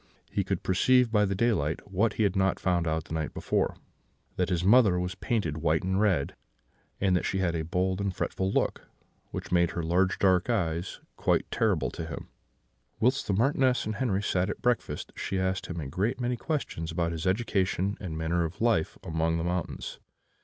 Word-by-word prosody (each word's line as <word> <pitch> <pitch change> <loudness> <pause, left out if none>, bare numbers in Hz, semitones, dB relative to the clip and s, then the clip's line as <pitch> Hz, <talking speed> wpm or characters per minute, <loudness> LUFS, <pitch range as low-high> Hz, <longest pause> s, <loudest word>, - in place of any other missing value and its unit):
He - - 0
could - - -2
perceive 125 +6 +3
by 105 -2 +4
the 100 0 -1
daylight 95 -6 0
what 105 +4 +2
he 110 - 0
had 100 -2 +1
not 95 0 +2
found 90 -2 +1
out 80 0 0
the - - -9
night 80 -2 -3
before, - - 0 0.6
that 90 -1 0
his 90 -2 0
mother 100 -3 +5
was 90 +1 -2
painted 90 -5 -1
white 80 0 +1
and 95 +2 +1
red, 90 -10 +1 0.6
and 95 -2 +2
that 90 - +1
she 95 - -1
had 90 -3 +1
a 80 - -1
bold 90 +3 0
and 100 -1 0
fretful 95 +1 -2
look, - - -1 0.4
which - - -6
made 85 -1 +4
her 85 - -2
large 90 +3 +2
dark 95 +1 +3
eyes 85 -6 -1 0.2
quite - - +2
terrible 105 - +1
to 80 - -6
him. 80 - -7 0.7
"Whilst 130 +4 +2
the 100 - +1
Marchioness 130 +3 +2
and 110 -1 -3
Henri 105 -5 0
sat 95 -2 +1
at - - -5
breakfast, 120 -1 -1
she 95 - -3
asked 95 0 -1
him 85 -1 -5
a 75 - -4
great 95 - -1
many 125 0 0
questions 120 - -3
about 85 0 0
his 80 +1 -3
education 95 -1 +1
and 85 -5 -5
manner 85 +2 0
of 80 +2 -5
life 115 -8 +1
among 80 0 0
the 80 - -2
mountains. 90 0 -3
95 Hz, 195 wpm, -28 LUFS, 85-105 Hz, 0.7 s, mother